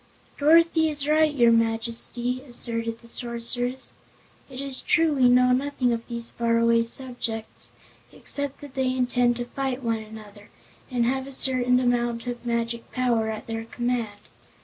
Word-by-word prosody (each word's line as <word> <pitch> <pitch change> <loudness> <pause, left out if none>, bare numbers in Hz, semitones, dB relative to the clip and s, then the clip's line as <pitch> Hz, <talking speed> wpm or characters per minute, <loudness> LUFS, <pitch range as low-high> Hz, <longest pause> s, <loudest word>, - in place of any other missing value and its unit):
"Dorothy 320 +1 +5
is 290 -2 -2
right, 310 0 +4
your 240 -5 +4
Majesty," 230 +2 0
asserted 230 -3 -2
the 235 - -14
Sorceress. 245 +2 -1 0.6
"It 260 -1 -9
is 275 -1 -3
true 330 -3 +3
we 255 -3 +4
know 250 0 +5
nothing 255 -1 +1
of 230 0 -5
these 235 -1 -2
faraway 230 0 +2
subjects, 230 -3 -5 0.4
except 285 -1 -3
that 285 -2 -10
they 260 -1 0
intend 245 -1 +2
to 240 - -3
fight 265 +1 -3
one 230 -1 0
another, 215 -1 -12 0.4
and 245 -3 +1
have 265 +2 -1
a - - -8
certain 250 -1 +2
amount 240 -1 0
of 240 -1 -5
magic 235 0 -2
power 235 -3 +1
at 215 -1 -5
their 225 0 -5
command. 240 -3 -2
245 Hz, 150 wpm, -25 LUFS, 230-260 Hz, 0.6 s, Dorothy